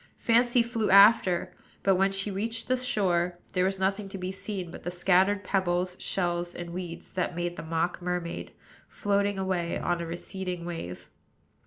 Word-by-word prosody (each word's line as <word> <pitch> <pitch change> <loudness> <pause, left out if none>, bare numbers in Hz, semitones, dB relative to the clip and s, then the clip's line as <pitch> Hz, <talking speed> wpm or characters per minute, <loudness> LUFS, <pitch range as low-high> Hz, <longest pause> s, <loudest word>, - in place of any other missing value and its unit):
Fancy 240 +1 +3
flew 230 -2 -1
after; 200 -3 +6 0.3
but, 195 - +4
when 195 +1 +3
she 195 +1 -1
reached 225 +4 -2
the 255 - +3
shore, 185 -9 0 0.2
there 180 0 +2
was 195 0 0
nothing 195 +1 -1
to 195 - -6
be 185 0 -4
seen 190 -3 -4
but - - -9
the - - -4
scattered 190 +3 +3
pebbles, 180 -1 0
shells, 175 -1 -1
and 175 -1 -6
weeds 175 -1 -6
that 180 -2 -1
made 175 0 -2
the - - -6
mock 165 +2 -1
mermaid, 180 -1 -3 0.4
floating 200 0 0
away 185 -3 -1
on 175 -1 -1
a - - -3
receding 180 +1 -4
wave. 125 - -6
185 Hz, 170 wpm, -28 LUFS, 175-200 Hz, 0.4 s, after